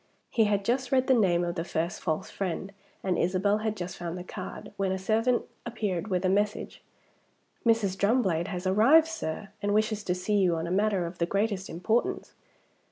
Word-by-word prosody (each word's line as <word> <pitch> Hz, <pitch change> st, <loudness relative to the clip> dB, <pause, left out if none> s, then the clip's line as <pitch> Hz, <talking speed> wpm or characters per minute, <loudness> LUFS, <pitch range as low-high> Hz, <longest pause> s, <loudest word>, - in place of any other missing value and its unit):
He 225 Hz, -, +3 dB
had 205 Hz, -1 st, 0 dB
just 250 Hz, +2 st, 0 dB
read 260 Hz, -1 st, +3 dB
the 265 Hz, -, +4 dB
name 180 Hz, -7 st, +3 dB
of 175 Hz, 0 st, -1 dB
the 165 Hz, -2 st, -3 dB
first 170 Hz, 0 st, -2 dB
false 155 Hz, -3 st, -2 dB
friend, 190 Hz, 0 st, -3 dB, 0.3 s
and 185 Hz, -2 st, 0 dB
Isabel 190 Hz, +4 st, +2 dB
had 215 Hz, 0 st, -2 dB
just 180 Hz, -1 st, -5 dB
found 175 Hz, 0 st, -4 dB
the 180 Hz, -, -6 dB
card, -, -, -8 dB
when 195 Hz, -1 st, 0 dB
a 190 Hz, -, 0 dB
servant 225 Hz, +5 st, +1 dB, 0.2 s
appeared 210 Hz, -6 st, -2 dB
with 185 Hz, -2 st, 0 dB
a -, -, +4 dB
message. 205 Hz, +2 st, 0 dB, 0.8 s
"Mrs. 225 Hz, -5 st, +2 dB
Drumblade 195 Hz, -5 st, +1 dB
has 180 Hz, -1 st, -5 dB
arrived, 225 Hz, +12 st, +6 dB
sir, 210 Hz, -, -5 dB
and 205 Hz, 0 st, +1 dB
wishes 215 Hz, -1 st, +1 dB
to 180 Hz, -, 0 dB
see 205 Hz, +3 st, 0 dB
you 180 Hz, -3 st, +3 dB
on 165 Hz, 0 st, -2 dB
a 170 Hz, -, -4 dB
matter 200 Hz, -2 st, +2 dB
of 170 Hz, +1 st, -7 dB
the 170 Hz, -, +1 dB
greatest 200 Hz, 0 st, -1 dB
importance." 215 Hz, +8 st, -1 dB
195 Hz, 195 wpm, -28 LUFS, 180-215 Hz, 0.8 s, arrived